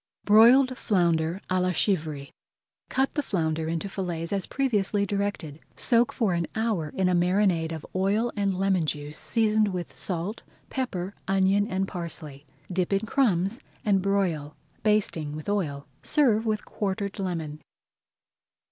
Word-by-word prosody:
BROILED 245 +5 +6
FLOUNDER 170 -2 +1
À 185 0 +1
LA 180 0 +1
CHIVRY 155 -7 -1 0.6
Cut 265 +1 +1
the 295 - 0
flounder 160 - -1
into 165 +4 -2
fillets 175 -3 -4
as 195 -2 -1
previously 210 -6 +1
directed. 200 -7 -3 0.2
Soak 235 0 +3
for 215 -6 0
an 170 -1 -1
hour 220 -9 0
in 190 -1 +2
a 180 - +2
marinade 175 -2 +2
of 160 -2 -6
oil 205 +5 +1
and 200 -2 0
lemon 190 -4 +1
juice, 150 0 -3
seasoned 220 -2 +2
with 180 -3 -4
salt, 185 +4 -2 0.3
pepper, 200 -8 -3
onion, 195 +1 +3
and 190 -2 -1
parsley. 155 -6 -6 0.3
Dip 185 0 0
in 195 0 +2
crumbs 210 -3 +1 0.3
and 200 -3 +3
broil, 180 -7 0 0.3
basting 195 -8 +1
with 155 - -8
oil. 155 -9 -1 0.2
Serve 235 -7 +2
with 215 -1 -1
quartered 200 0 -3
lemon. 160 -5 -3
190 Hz, 140 wpm, -26 LUFS, 165-210 Hz, 0.6 s, BROILED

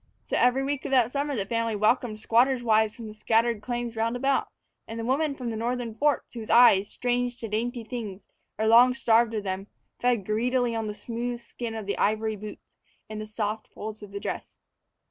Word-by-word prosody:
So - - -2
every 250 +2 +3
week 280 0 -2
of - - -2
that 250 -3 +3
summer 285 +1 -1
the 200 -4 -1
family 230 +1 -1
welcomed 215 +1 +1
squatters' 245 +3 +3
wives 220 -2 +3
from 235 - -9
the 215 - -8
scattered 225 0 +1
claims 240 0 -3
round 225 +2 0
about, 270 +2 +1 0.4
and 225 0 -5
women 280 +2 +1
from 250 -3 -4
the - - -4
northern 235 +1 -2
forts, 290 +5 0
whose 225 -3 -7
eyes, 220 -4 +6
strange 245 0 -1
to 230 - -5
dainty 230 +3 -2
things 215 -4 -6 0.3
or 220 - 0
long 240 +3 +6
starved 230 -2 +3
of 210 - -2
them, 190 0 -4 0.3
fed 245 -5 +1
greedily 245 +3 +1
on 225 -1 -2
the 210 - -4
smooth 240 +2 -4
skin 235 -1 -6
of 220 -2 -5
the 200 - -3
ivory 215 +1 +1
boots 210 +1 -10 0.4
and 215 0 -5
the 215 - -6
soft 215 0 -3
folds 215 0 -8
of 205 - -9
the 200 - -5
dress. - - -5
230 Hz, 205 wpm, -27 LUFS, 215-245 Hz, 0.4 s, eyes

